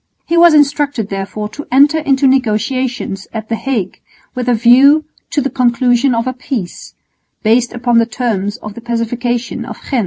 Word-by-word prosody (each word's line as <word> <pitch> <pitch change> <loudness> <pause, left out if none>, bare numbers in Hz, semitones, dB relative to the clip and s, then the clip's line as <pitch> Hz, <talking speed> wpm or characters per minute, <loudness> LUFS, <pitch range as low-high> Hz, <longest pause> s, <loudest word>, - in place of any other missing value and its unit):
He 340 - -1
was 340 -2 +6
instructed 285 -6 +1
therefore 195 +2 -4
to 295 +6 -9
enter 285 +4 +4
into 275 -2 +1
negotiations 250 -4 -1
at 220 -1 -6
the 230 - 0
Hague 225 -7 -3 0.3
with 250 -1 -3
a 245 - +3
view 265 +7 +5 0.2
to 290 - 0
the 275 - -1
conclusion 245 0 +2
of 230 +1 -1
a 255 - -2
peace, 245 -7 -6 0.5
based 235 +2 +2
upon 240 -1 +1
the 230 - +1
terms 215 -3 -2
of 210 -4 -9
the 235 - -10
Pacification 240 +1 -3
of - - -8
Ghent. 260 - +2
245 Hz, 175 wpm, -15 LUFS, 225-270 Hz, 0.5 s, was